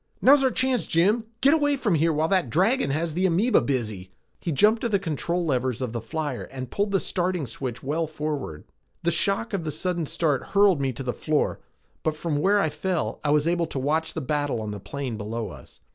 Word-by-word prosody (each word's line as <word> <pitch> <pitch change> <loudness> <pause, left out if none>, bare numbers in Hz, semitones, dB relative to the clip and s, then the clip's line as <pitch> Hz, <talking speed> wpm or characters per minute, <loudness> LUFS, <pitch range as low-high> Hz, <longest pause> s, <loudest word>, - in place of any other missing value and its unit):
"Now's 275 +1 +6
our 260 - +4
chance, 255 -1 0
Jim!" 170 +4 +4
I - - +6
cried. 220 0 -24
"Get 275 +3 +6
away 290 -3 +2
from 215 -8 +1
here 165 +1 +3
while 155 +1 +1
that 185 -7 +1
dragon 195 - +2
has 155 +3 -1
the 185 +3 +2
amoeba 195 +8 +3
busy!" 110 -9 -2 0.3
He 170 - -3
jumped 215 - +4
to 235 - 0
the 205 - +3
control 170 - -2
levers 130 -5 0
of 125 -3 -3
the 115 - -3
flyer 145 +1 -4
and 130 -2 -7
pulled 205 +1 0
the 195 -1 +2
starting 180 -4 -1
switch 125 0 -6
well 155 +4 -1
forward. 150 - -4 0.4
The 170 - +2
shock 195 +6 0
of 190 -4 -1
the 155 - -3
sudden 170 +1 -2
start 150 -4 0
hurled 200 -7 +5
me 135 -1 +1
to 130 +2 -6
the 125 -1 -2
floor, 155 -1 0 0.4
but 155 -1 -1
from 155 -2 -1
where 200 +6 +3
I 180 - +2
fell 180 +1 -2
I 150 - 0
was 150 +1 +3
able 170 -1 +1
to - - -5
watch 150 +5 0
the 160 - -2
battle 145 -2 -1
on 110 -1 -4
the 105 - -6
plain 120 +4 -5
below 110 +1 -4
us. - - -13
160 Hz, 230 wpm, -25 LUFS, 135-190 Hz, 0.4 s, Now's